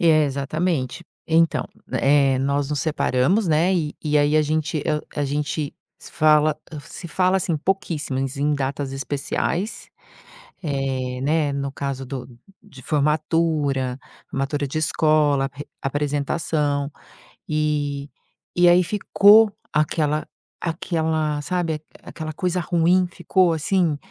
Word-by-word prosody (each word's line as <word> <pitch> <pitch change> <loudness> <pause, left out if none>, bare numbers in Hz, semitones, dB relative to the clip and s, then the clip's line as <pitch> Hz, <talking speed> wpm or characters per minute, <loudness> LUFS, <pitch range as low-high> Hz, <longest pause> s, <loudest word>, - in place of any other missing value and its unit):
É, 155 -3 +5
exatamente. 140 +2 -2 0.2
Então, 165 0 +3 0.3
eh, 135 -1 +3
nós 140 +1 0
nos 150 - 0
separamos, 160 - +1
né, 165 +5 +3
e 155 -4 -1
e 150 -1 +1
aí 145 +1 +3
a 155 - +5
gente 155 0 -1
eu 150 -1 0 0.2
a 145 - 0
gente 145 +1 -2 0.2
se - - -12
fala 155 0 +4 0.3
se 170 +3 -9
fala 185 +3 +2
assim 170 -3 0
pouquíssimas 150 -7 -2
em 150 +1 +1
datas 135 0 -3
especiais, 145 - -2 0.8
eh, 135 -4 -2
né, 150 0 +1
no 140 -1 -3
caso 135 -1 -4
do 130 -1 -6 0.4
de 165 -11 -14
formatura, 150 -3 +1 0.3
formatura 140 +1 -2
de 140 - -4
escola. 150 -3 +2
Re 145 +1 -8 0.2
apresentação. 145 +1 -1 0.6
E 145 -2 -1 0.5
e 175 0 +5
aí 180 +1 +6
ficou 210 +3 +5 0.2
aquela 150 0 +1 0.4
aquela, 160 -3 -1
sabe, 165 -2 -2 0.2
aquela 155 -1 -6
coisa 180 +1 -1
ruim, 175 +2 +2
ficou 185 -3 +2
assim. 160 -1 +1
150 Hz, 120 wpm, -22 LUFS, 140-165 Hz, 0.8 s, aí